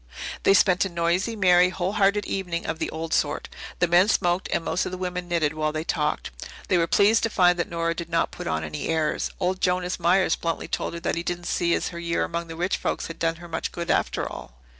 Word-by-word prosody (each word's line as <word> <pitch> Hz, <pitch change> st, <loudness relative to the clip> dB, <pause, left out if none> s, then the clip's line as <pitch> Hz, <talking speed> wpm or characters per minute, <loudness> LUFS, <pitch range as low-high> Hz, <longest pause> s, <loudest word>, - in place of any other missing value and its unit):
They 195 Hz, -, +5 dB
spent 185 Hz, -1 st, +4 dB
a 195 Hz, -, -2 dB
noisy, 175 Hz, +6 st, 0 dB
merry, 180 Hz, -3 st, +5 dB
whole 185 Hz, 0 st, -2 dB
hearted 205 Hz, 0 st, +2 dB
evening 180 Hz, -3 st, -3 dB
of 160 Hz, 0 st, -3 dB
the -, -, -1 dB
old 160 Hz, 0 st, -4 dB
sort. 145 Hz, -, 0 dB, 0.3 s
The 175 Hz, -, +2 dB
men 175 Hz, +3 st, +5 dB
smoked 180 Hz, -3 st, +1 dB
and 165 Hz, -, 0 dB
most 180 Hz, -, 0 dB
of -, -, -4 dB
the 185 Hz, -, -4 dB
women 180 Hz, -1 st, -4 dB
knitted 165 Hz, -4 st, +1 dB
while 155 Hz, 0 st, -1 dB
they 155 Hz, +1 st, -3 dB
talked. 150 Hz, -2 st, -1 dB, 0.4 s
They 185 Hz, -, +4 dB
were 165 Hz, -, +2 dB
pleased 210 Hz, +4 st, +4 dB
to 225 Hz, -, +1 dB
find 180 Hz, -4 st, +3 dB
that 175 Hz, -, -1 dB
Nora 165 Hz, 0 st, -1 dB
did 170 Hz, 0 st, -6 dB
not 165 Hz, 0 st, +1 dB
put -, -, -7 dB
on 80 Hz, -1 st, -1 dB
any 75 Hz, -1 st, -4 dB
airs. 160 Hz, -2 st, 0 dB
Old 185 Hz, 0 st, -1 dB
Jonas 180 Hz, 0 st, 0 dB
Myers 185 Hz, +3 st, +3 dB
bluntly 165 Hz, -1 st, -3 dB
told -, -, -3 dB
her -, -, -5 dB
that -, -, -1 dB
he 170 Hz, -, -1 dB
didn't 175 Hz, 0 st, -4 dB
see 170 Hz, -1 st, +1 dB
as -, -, -2 dB
her 170 Hz, -, -7 dB
year 170 Hz, 0 st, 0 dB
among 170 Hz, 0 st, -3 dB
rich 175 Hz, +4 st, -1 dB
folks -, -, -2 dB
had 165 Hz, -, -8 dB
done 165 Hz, 0 st, +1 dB
her 175 Hz, +1 st, -11 dB
much 160 Hz, -1 st, -3 dB
good, 170 Hz, 0 st, -3 dB
after -, -, 0 dB
all. -, -, -9 dB
175 Hz, 245 wpm, -25 LUFS, 165-185 Hz, 0.4 s, They